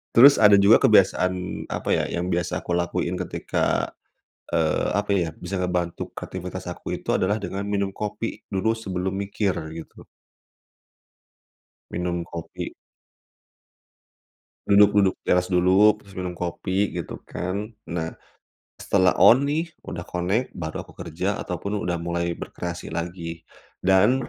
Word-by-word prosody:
Terus, 140 +4 +9
ada 105 -1 +8
juga 100 +3 +7
kebiasaan, 90 0 +3
apa - - -4
ya, - - +2
yang 90 +1 -2
biasa 85 -1 -1
aku - - -5
lakuin 85 0 0
ketika, - - -1 0.6
eee, 80 -2 +1
apa 105 0 -1
ya, 90 -4 +2
bisa 90 +1 -4
ngebantu 90 -2 -2
kreativitas - - -6
aku - - -5
itu, - - -5
adalah 100 +3 +2
dengan 100 0 -4
minum 100 -1 0
kopi 105 +1 -4
dulu, 100 +4 +1
sebelum 95 -4 -3
mikir, 100 0 0 0.2
gitu. 80 - -10 1.9
Minum 85 0 -2
kopi. 85 -1 -7 1.9
Duduk-duduk 100 -1 +5
di - - -68
teras 90 0 +3
dulu, 95 +4 +5
habis 100 -2 -18
itu, 95 - -10
minum 90 -1 -3
kopi, 95 +3 -1
gitu 85 - -6
kan. 100 +5 -4 0.2
Nah, 80 -1 -3 0.7
setelah 95 -2 +2
on 130 +4 +7
nih, 160 +2 -1
udah 85 -1 -6
connect, 95 +8 -1
baru 80 -3 -5
aku - - -15
kerja, - - -3
ataupun, 100 +1 -3
udah 85 0 -1
mulai 85 0 -2
berkreasi 85 -2 -6
lagi. 85 -1 -5 0.4
Dan, 105 +8 +4
95 Hz, 135 wpm, -24 LUFS, 85-100 Hz, 1.9 s, Terus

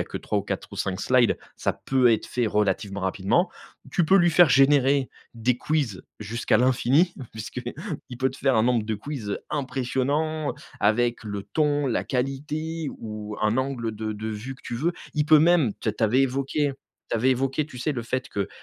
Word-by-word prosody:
a - - -8
que - - -7
3 - - -1
ou - - -2
4 - - -4
ou - - -7
5 95 -1 -2
slides 125 -2 +3 0.2
ça - - 0
peut 130 -3 +2
être 110 - -1
fait 120 -2 -1
relativement 100 -1 0
rapidement. 100 - +1 0.4
Tu 175 - +2
peux 195 - +6
lui 175 -2 +5
faire 170 -1 +6
générer 135 0 +4 0.2
des 120 +2 0
quiz 140 -11 -1 0.2
jusqu'à 115 +3 0
l'infini 130 +7 +3 0.2
puisqu'il 125 - -6
peut 130 -1 +1
te 135 - -12
faire 135 -3 +2
un 110 - +4
nombre 120 -3 +2
de 110 - -1
quiz, 120 -2 -6
heu, - - -2
impressionnant, 140 +3 -1 0.3
avec 120 +3 +2
le 100 -2 -4
ton, 145 0 0
la 115 - 0
qualité 150 +4 -2
ou 105 -1 -6
un 110 +3 +2
angle 125 -5 -2
de 110 0 -3
de 110 +1 -5
vue 110 +5 -5
que - - -21
tu 120 - -4
veux. 165 +7 0 0.2
Il 150 0 +1
peut 155 -1 +7
même- 160 -9 +4
tu - - -2
as - - -8
tu 110 - -6
avais 125 +5 +3
évoqué 135 +2 0 0.4
tu - - +1
avais 130 +4 +3
évoqué 135 +3 0
tu 125 -5 -11
sais, 150 +4 -1
le 120 -3 -3
fait 130 +3 -3
que 100 -1 -2
130 Hz, 205 wpm, -25 LUFS, 110-145 Hz, 0.4 s, peut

